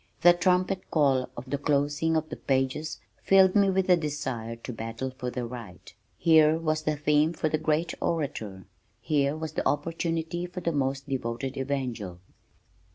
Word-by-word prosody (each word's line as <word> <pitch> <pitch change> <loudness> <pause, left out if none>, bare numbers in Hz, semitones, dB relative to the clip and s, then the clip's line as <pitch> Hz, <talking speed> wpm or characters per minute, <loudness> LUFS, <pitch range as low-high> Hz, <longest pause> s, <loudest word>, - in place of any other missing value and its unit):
The 175 +1 +8
trumpet 185 +1 +1
call 135 -5 +2
of 130 - -7
the 140 +2 -2
closing 145 +2 +1
pages 145 0 -2 0.2
filled 190 0 +5
me 200 -1 +5
with 190 -1 +1
a 180 - +7
desire 135 -8 -3
to 115 +2 -8
battle 115 +4 -5
for 125 -1 -4
the 125 0 -4
right. 115 -7 -9 0.2
Here 160 -1 +5
was 155 -1 -1
a 155 - +2
theme 150 +2 +2
for 155 - -1
the 155 - 0
great 155 +2 0
orator. 110 - -3 0.3
Here 145 -1 +1
was 160 -1 -5
opportunity 165 +2 -1
for 180 +1 -7
the 170 - 0
most 135 -1 -1
devoted 130 -1 -3
evangel. 125 -9 -3
150 Hz, 155 wpm, -27 LUFS, 130-165 Hz, 0.3 s, The